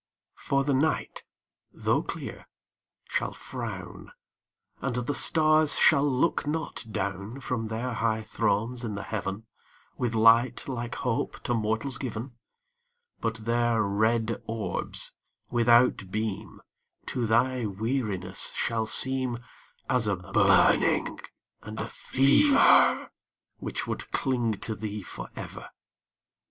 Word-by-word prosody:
The 140 +1 +2
night 150 +4 -1 0.5
tho' - - 0
clear - - -7 0.6
shall - - -2
frown - - -7 0.7
And 135 -3 -2
the 125 +3 -2
stars 155 +3 +3
shall 145 -1 +5
not 140 +3 0
look 160 -4 -3
down 100 +5 -4
From 125 -4 -3
their 115 +3 -3
high 110 0 -1
thrones 115 +3 -1
in 110 -3 -4
the 100 - -5
Heaven, 105 0 -4 0.5
With 120 -2 -1
light 115 +2 +4
like 120 -3 -4
Hope 125 +3 -2
to 120 - -1
mortals 110 +3 -1
given 125 0 -5 0.9
But 115 -1 -4
their 120 -1 +2
red 110 +3 0
orbs, 115 -2 -3 0.4
without 120 -4 +3
beam, 105 0 -4 0.4
To 120 -2 -2
thy 120 +1 +2
weariness 100 -3 -2
shall 110 -1 -1
seem 130 0 +5 0.5
As 125 -4 +1
a 105 - +1
burning 90 -1 +3 0.4
and - - -8
a - - -2
fever 270 - +4 0.5
Which - - -4
would - - -5
cling 120 -4 0
to 110 - -2
thee 105 -1 -5
forever. - - -8
115 Hz, 115 wpm, -27 LUFS, 110-130 Hz, 0.9 s, shall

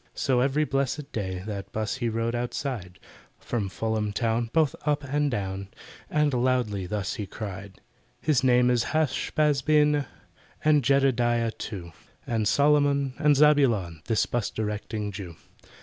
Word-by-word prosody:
So 130 -2 +1
every 135 +4 +2
blessed 140 0 -2
day 95 -4 -4
That 100 -2 -6
'bus 110 +3 -2
he 120 -2 -1
rode 115 +1 -1
outside, 120 -6 -4 0.4
From 105 -5 -3
Fulham 110 +1 -2
town, 115 +1 0
both 155 -1 +2
up 145 -1 0
and 145 +1 0
down, 100 -4 -3 0.4
And 150 -2 +2
loudly 120 -6 0
thus 100 -1 -2
he 105 - -5
cried: 100 -1 -8 0.4
"His 145 -5 +1
name 125 -1 +4
is 120 -1 +2
HASH 150 -4 0
BAZ 150 -3 +3
BEN, 150 -1 +3 0.6
And 150 -2 +4
JEDEDIAH 120 -3 +2
too, 90 -6 -6 0.3
And 110 -3 0
SOLOMON 140 0 +3
and 150 -1 +4
ZABULON— 125 - +3
This 115 - +1
'bus 120 -3 -2
directing 105 -1 -3
Jew." 95 -4 -8
120 Hz, 145 wpm, -26 LUFS, 105-140 Hz, 0.6 s, name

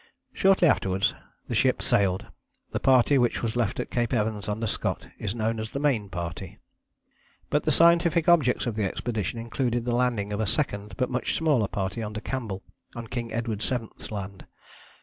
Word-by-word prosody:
Shortly 190 -2 +4
afterwards 95 -8 +2 0.3
the - - -4
ship - - +3
sailed. 95 -2 +2 0.5
The - - -1
party 130 +1 +4
which 120 -1 +1
was 115 -1 -1
left 120 -4 0
at - - -4
Cape 120 0 0
Evans 105 -2 -1
under 110 +2 -2
Scott 105 - -1
is 105 0 -3
known 115 0 -1
as 110 0 -4
the 140 - -4
Main 125 -9 +1
Party. 85 -3 -6 0.9
But - - +1
the - - +3
scientific 170 0 +4
objects 155 -8 +4
of 120 - -1
the 105 0 -1
expedition 110 +1 -2
included 120 +1 -1
the 120 - 0
landing 120 -5 0
of 105 - -2
a 110 - 0
second 105 -6 -1
but 130 -1 0
much 125 - -1
smaller 145 -10 +2
party 95 +3 -3
under 110 0 -4
Campbell 110 -5 -4 0.3
on 115 -1 -5
King 120 -2 -3
Edward 115 -2 -2
VII.'s 120 -2 -3
Land. 100 -2 -6
115 Hz, 180 wpm, -26 LUFS, 105-125 Hz, 0.9 s, Shortly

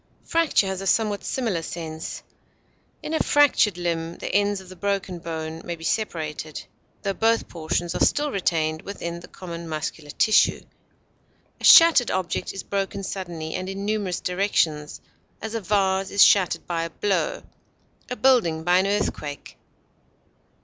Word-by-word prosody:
Fracture 330 -10 +2
has 190 0 -3
a 195 - -4
somewhat 210 -1 +1
similar 225 -10 -1
sense. 160 -1 -6 0.8
In 310 - -4
a 315 - +1
fractured 270 -10 +3
limb, 170 -1 -2
the - - -5
ends 205 0 +2
of 190 - -13
the 185 - -11
broken 195 -2 -2
bone 160 -1 -5
may 170 - -4
be 165 - -13
separated, 160 -6 -3 0.4
tho 200 -1 0
both 225 +3 +1
portions 170 +1 -2
are - - +1
still 295 0 +2
retained 160 -5 0
within 170 -4 -6
the 170 - -12
common 170 -2 -8
muscular 155 -1 -5
tissue. 215 +8 +3 1.0
A - - -14
shattered 330 -7 +8
object 185 -2 -2
is 195 - -7
broken 195 0 -3
suddenly 170 -5 -5
and 185 +1 -4
in 195 +1 -5
numerous 205 -4 -1
directions; 170 -5 -1 0.4
as, 220 +1 -6
a 230 - -2
vase 195 -1 +1
is 200 - +6
shattered 180 -4 +4
by 170 -1 -2
a 165 - -3
blow, 210 - -1 0.7
a 250 - -3
building 195 -13 +3
by 175 +2 +4
an 190 - +1
earthquake. 175 -8 -3
185 Hz, 155 wpm, -24 LUFS, 165-205 Hz, 1.0 s, shattered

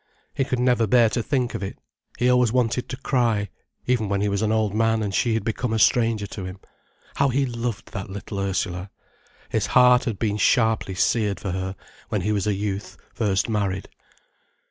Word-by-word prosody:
He 135 - 0
could 130 -2 -1
never 125 -2 +2
bear 115 +1 +5
to 120 - -1
think 125 0 -1
of - - -4
it, 95 - -5 0.4
he 120 - +2
always 125 -2 +4
wanted 125 0 0
to 130 - -4
cry, 115 -7 0 0.4
even 120 -5 +1
when 100 0 0
he 105 +1 +1
was 100 0 -1
an 110 -1 +1
old 110 -2 +1
man 115 0 +2
and 100 -2 -3
she 115 +1 +2
had 110 - -1
become 115 +1 -2
a - - +1
stranger 115 -1 +3
to 100 -1 -7
him. 90 +1 -7 0.6
How 140 0 +3
he 135 +2 +1
loved 120 -3 -4
that 95 0 -5
little 100 +1 -6
Ursula!—his 95 -1 -4
heart 125 0 +5
had 115 -5 -2
been 105 -1 -1
sharply 110 -5 +2
seared 105 +1 +1
for 95 - -4
her, 95 +1 -3 0.3
when 105 -4 -1
he 105 +4 0
was 105 -1 0
a 105 - +1
youth, 100 0 -4 0.2
first 100 -4 0
married. 100 -4 -2
110 Hz, 195 wpm, -24 LUFS, 100-120 Hz, 0.6 s, bear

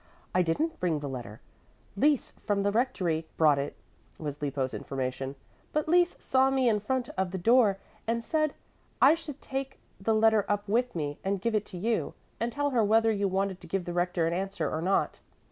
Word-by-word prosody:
"I 185 - +4
didn't 310 - 0
bring 165 -4 +1
the 145 - -5
letter. 120 -5 -7 0.5
Lise 285 +6 +2 0.2
from 200 -1 +2
the 205 - +2
rectory 180 -9 0
brought 150 -3 +5
it," 140 +1 -3 0.4
was 150 -2 -5
Lippo's 135 -2 -1
information. 135 0 -3 0.4
"But 305 0 0
Lise 350 +2 +4
saw 265 0 +3
me 265 -2 +2
in 215 -3 +3
front 245 +4 -1
of 190 -1 -1
the 190 - -4
door 220 +1 +4 0.3
and 230 +1 0
said 310 +3 +1
that - - -19 0.4
I 280 - +7
should 310 -4 -6
take 270 0 -4 0.2
the 220 +3 +1
letter 220 -1 +4
up 205 0 0
with 245 +3 +1
me 145 -3 -3
and 195 0 0
give 230 +4 -1
it 210 -1 0
to 185 - -8
you, 225 +5 -1 0.2
and 235 +1 -1
tell 285 +2 0
her 235 -4 +3
whether 225 +2 +4
you 200 -2 +1
wanted 190 0 -1
to 175 - -11
give 185 +1 -2
the 175 - -4
Rector 175 -1 +1
an 165 - 0
answer 190 -3 -2
or 155 - -2
not." 190 +3 +1
200 Hz, 205 wpm, -29 LUFS, 165-240 Hz, 0.5 s, I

